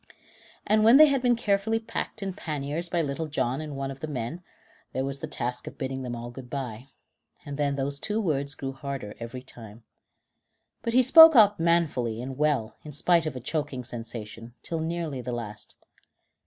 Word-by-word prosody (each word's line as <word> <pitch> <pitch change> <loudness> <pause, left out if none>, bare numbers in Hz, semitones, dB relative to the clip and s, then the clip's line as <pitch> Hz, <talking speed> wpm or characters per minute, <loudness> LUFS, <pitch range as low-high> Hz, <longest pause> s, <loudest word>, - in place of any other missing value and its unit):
And 215 +1 +3
when 230 +4 +8
they 310 - +10
had 280 -3 +1
been 245 -1 +3
carefully 220 0 +1
packed 225 -1 -5
in 195 -1 -3
panniers 155 +1 -4
by 170 -2 +1
Little 150 +2 -3
John 135 -2 -1
and 150 -2 -6
one 135 0 -3
of 135 - -9
the 155 - -5
men, 140 +4 -4 0.5
there 130 - -1
was 140 0 -4
the 160 - -5
task 125 -4 -4
of - - -8
bidding 130 0 -3
them 125 -2 -4
all 120 +1 -7
good 125 0 -10
bye, 125 -3 -5 0.6
and 145 - -5
then 140 -1 0
those 140 +1 -3
two 210 +7 -1
words 145 -7 -1
grew 135 -1 -4
harder 135 -5 -6
every 120 +2 -7
time. 115 -3 -13 1.0
But 230 0 -2
he 255 +1 +6
spoke 320 +4 +9
out 210 -4 +6
manfully 155 -9 +1
and 130 +2 -5
well, 145 -6 0
in 150 - -9
spite 165 +3 +3
of 145 - -4
a - - -4
choking 145 0 -3
sensation, 115 -1 -8
till 165 - -3
nearly 160 -4 -3
the 125 0 -4
last. 105 -3 -7
140 Hz, 195 wpm, -27 LUFS, 125-170 Hz, 1.0 s, they